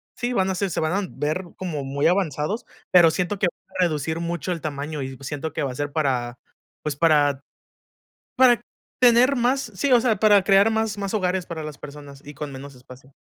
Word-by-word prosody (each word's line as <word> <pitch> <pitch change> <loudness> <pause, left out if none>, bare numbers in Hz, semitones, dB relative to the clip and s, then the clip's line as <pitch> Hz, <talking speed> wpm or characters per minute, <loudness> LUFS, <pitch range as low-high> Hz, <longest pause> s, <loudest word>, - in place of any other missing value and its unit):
sí, 245 0 -2
van 190 -4 +1
a 190 - -1
ser 200 +1 -1
se - - -2
van 155 0 0
a - - -9
ver 155 +5 -2
como 165 -6 -4
muy 140 +2 0
avanzados, 180 - -1 0.3
pero 175 -2 +7
siento 180 +4 -2
que 195 - +3
va 175 - -10
a - - +4
reducir 160 -1 -1
mucho 170 -1 -3
el 170 -4 -3
tamaño 150 0 -4
y 130 -1 -6
siento 145 +2 -5
que 160 - -2
va 135 - -2
a - - -8
ser 145 +2 -3
para, 125 -5 -1 0.5
pues, 150 -2 -2
para 145 -3 +3 0.9
para 245 -2 +5 0.4
tener 250 +2 +5
más 255 +3 +1
sí, 275 +9 0
o 240 - +6
sea, 225 -5 +1
para 205 -2 +5
crear 195 +3 +5
más 220 -1 -1
más 200 0 -4
hogares 185 -3 0
para 165 -3 -6
las 150 -2 -7
personas 140 -1 -11
y 145 - -9
con 145 0 -6
menos 135 +1 -10
espacio. 130 +2 -16
160 Hz, 215 wpm, -23 LUFS, 145-200 Hz, 0.9 s, pero